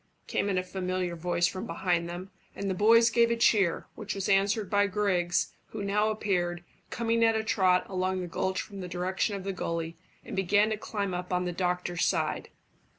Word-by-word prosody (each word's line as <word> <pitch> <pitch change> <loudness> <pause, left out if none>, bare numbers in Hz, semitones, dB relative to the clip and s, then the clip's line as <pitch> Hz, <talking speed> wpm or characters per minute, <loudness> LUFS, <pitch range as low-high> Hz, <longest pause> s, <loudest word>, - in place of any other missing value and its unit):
came 205 - -1
in 190 - 0
a 185 - +1
familiar 185 -1 -2
voice 175 +1 0
from 185 +1 -2
behind 170 0 0
them, 180 +3 -7 0.2
and 200 - -4
the 190 - 0
boys 230 +4 +5
gave 235 0 +4
a 235 - +2
cheer, 205 -6 +3
which 210 -1 -5
was 195 -1 -2
answered 200 +1 +2
by 205 +1 +3
Griggs, 185 -3 0
who 205 - -6
now 210 +2 +2
appeared, 175 -5 -1 0.3
coming 230 -1 +1
at 225 -1 +4
a 220 - 0
trot 185 -5 +3
along 185 0 -1
the 180 - -3
gulch 185 +2 -2
from 200 -2 -6
the 180 - -5
direction 185 +3 -1
of 195 - -5
the 195 0 -3
gully, 165 -2 -3 0.3
and - - -6
began 205 +3 +3
to - - +1
climb 200 -3 -3
up 180 +1 -4
on 180 0 +1
the 180 - -1
doctor's 180 0 -1
side. - - 0
190 Hz, 205 wpm, -29 LUFS, 180-205 Hz, 0.3 s, boys